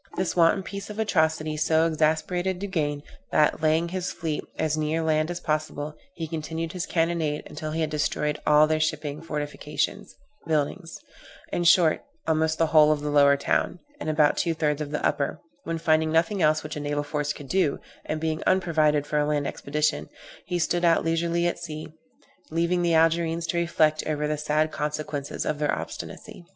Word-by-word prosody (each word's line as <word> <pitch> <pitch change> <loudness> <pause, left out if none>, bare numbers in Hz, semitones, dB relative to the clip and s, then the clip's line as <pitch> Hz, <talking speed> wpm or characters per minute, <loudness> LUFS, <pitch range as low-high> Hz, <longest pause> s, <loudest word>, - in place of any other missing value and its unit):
This 185 0 -1
wanton 170 +2 +4
piece 200 +1 -7
of 210 - -7
atrocity 160 -7 +1
so 160 +1 +3
exasperated 165 +4 0
Duguesne, 155 -7 -2 0.3
that, 150 0 +3
laying 160 +2 +2
his 180 0 -3
fleet 155 -2 -3
as 155 -1 0
near 155 +1 -1
land 155 0 +1
as 175 0 -3
possible, 155 -1 -2 0.2
he 165 - -4
continued 160 +1 -4
his 180 0 -4
cannonade 165 -3 0
until 155 0 -6
he 160 +1 -2
had 155 - -1
destroyed 150 0 -1
all 150 +1 +6
their 155 0 0
shipping, 155 -1 -2
fortifications, 150 -3 -3 0.3
buildings; 160 +3 -1 0.6
in 175 - 0
short, 165 -1 +5 0.2
almost 160 0 +1
the 165 - +3
whole 155 -1 +7
of 150 -1 0
the 150 0 -2
lower 140 -1 +5
town, 140 - 0 0.2
and - - -3
about 150 -1 +3
two 165 -2 0
thirds 150 -1 0
of 150 - -3
the 150 - -2
upper; 140 - 0 0.3
when 165 0 -2
finding 160 -1 +2
nothing 165 +5 +2
else 155 0 +3
which 155 0 -6
a - - -4
naval 145 0 -2
force 145 0 -2
could 145 -1 -8
do, 180 -3 +1 0.2
and 155 - -3
being 160 0 -2
unprovided 155 -5 +2
for 150 0 0
a 150 - +1
land 145 -1 0
expedition, 150 - -1 0.4
he 180 - -1
stood 175 +1 0
out 170 -1 +3
leisurely 170 +1 +1
to 175 - +1
sea, 155 -2 -6 0.6
leaving 170 +2 +1
the 170 -1 +2
Algerines 165 +1 +2
to 175 - -2
reflect 160 -3 +2
over 150 -1 -1
the 150 - 0
sad 150 +1 0
consequences 150 -1 -3
of 150 - -1
their 150 - +1
obstinacy. - - -6
155 Hz, 185 wpm, -26 LUFS, 150-165 Hz, 0.6 s, whole